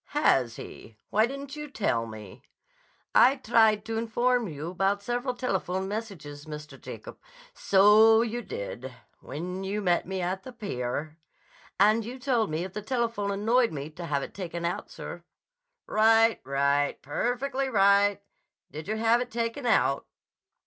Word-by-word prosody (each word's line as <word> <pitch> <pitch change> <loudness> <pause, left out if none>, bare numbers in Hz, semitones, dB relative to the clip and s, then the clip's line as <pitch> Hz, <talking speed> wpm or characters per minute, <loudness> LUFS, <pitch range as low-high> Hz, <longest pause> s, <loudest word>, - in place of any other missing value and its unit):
"Has 130 - +3
he? 110 0 -11
Why 220 +2 +4
didn't 275 +2 -7
you 300 0 -7
tell 120 - -1
me?" 105 -3 -10 0.7
"I 260 +3 +6
tried 220 -4 +3
to 225 0 -2
inform 240 +1 +1
you 155 +1 -6
about 195 +2 0
several 245 +3 -2
telephone 190 -6 -2
messages, 185 -9 -6
Mr. 150 0 -9
Jacob—" - - -9 0.3
"So 215 - +6
you 235 +1 -3
did, 130 - -6 0.3
when 180 +7 -6
you 200 +2 -2
met 180 -4 +1
me 190 0 -3
at 185 +2 -2
the 255 - -10
pier." 155 - -4 0.6
"And 215 +3 +5
you 245 +4 -7
told 245 -4 0
me 155 +2 -2
if 185 0 -7
the 210 - -4
telephone 230 -3 -1
annoyed 225 +5 +2
me, 145 0 -6
to 170 +2 -7
have 140 -2 0
it - - -8
taken 170 -3 -5
out, 170 - -3
sir." - - -8 0.6
"Right; 225 +1 +4
right; 140 +1 +1
perfectly 255 - -1
right! 200 -2 +4 0.5
Did 155 +1 -8
you 215 - -1
have 230 +2 +3
it 245 - -4
taken 235 +2 -3
out?" 140 -11 +2
205 Hz, 155 wpm, -27 LUFS, 165-235 Hz, 0.7 s, I